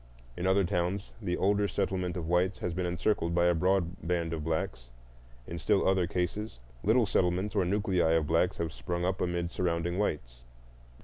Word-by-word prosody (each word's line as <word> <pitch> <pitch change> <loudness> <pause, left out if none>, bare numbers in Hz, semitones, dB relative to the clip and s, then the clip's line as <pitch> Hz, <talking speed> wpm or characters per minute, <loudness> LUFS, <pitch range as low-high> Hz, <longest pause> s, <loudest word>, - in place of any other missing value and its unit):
In 90 - -2
other 95 +1 +4
towns 90 +3 -1
the 90 -4 -1
older 100 +1 +2
settlement 90 -3 -1
of 80 -2 -4
whites 90 +2 +2
has 90 - -3
been 90 0 -1
encircled 85 -1 0
by 85 0 +3
a 90 - +4
broad 90 0 +1
band 85 -1 -1
of 80 -2 -3
blacks; 65 -6 -3 0.6
in 85 +5 -6
still 100 +4 +2
other 95 -2 +3
cases 90 - -2 0.3
little 115 +4 +4
settlements 95 +1 +1
or 100 -4 +2
nuclei 95 -4 +2
of 80 -2 +2
blacks 85 +4 +1
have 80 -1 -3
sprung 85 +1 -3
up 95 +1 -1
amid 85 -1 -1
surrounding 85 0 -1
whites. - - -2
90 Hz, 180 wpm, -30 LUFS, 85-95 Hz, 0.6 s, other